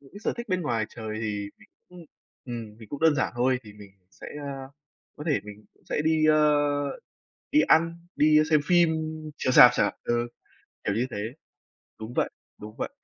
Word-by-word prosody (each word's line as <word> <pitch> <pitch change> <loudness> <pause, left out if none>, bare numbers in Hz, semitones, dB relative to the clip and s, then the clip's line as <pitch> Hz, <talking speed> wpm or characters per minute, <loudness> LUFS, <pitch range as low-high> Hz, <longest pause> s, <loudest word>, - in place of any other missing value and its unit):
Những 135 -1 -20
c - - -18
sở - - +1
thích 235 -1 -6
bên 185 -2 0
ngoài 115 -7 -1
trời 110 -1 -6
thì 105 -2 -3
mình - - -20 0.2
cũng, 180 -1 -13 0.4
ừm, 115 -4 -7
mình 110 - -13
cũng 145 - -6
đơn 160 -1 +5
giản - - 0
thôi, 125 +1 +2
thì 105 - -13
mình 105 -1 -14
cũng 90 -1 -43
sẽ, - - -12
ơ, 135 -2 -7 0.5
có 150 - -8
thể 150 - +1
mình 105 0 -11
cũng - - -31
sẽ - - -1
đi, 160 -1 +3
ơ, 155 -1 +5 1.0
đi 300 - +6
ăn, 170 - +2
đi 150 +1 +5
xem 155 -2 +5
phim 170 -3 +4 0.4
chiếu 130 - 0
rạp 125 -1 +10
chẳng 110 - +3
hạn - - -3
ừ, 120 0 0 0.6
kiểu 100 - 0
như 120 +4 0
thế 110 - -5 0.8
đúng 110 +2 -7
vậy, - - +1 0.3
đúng 105 +1 -10
vậy, - - -3
130 Hz, 205 wpm, -26 LUFS, 110-155 Hz, 1.0 s, rạp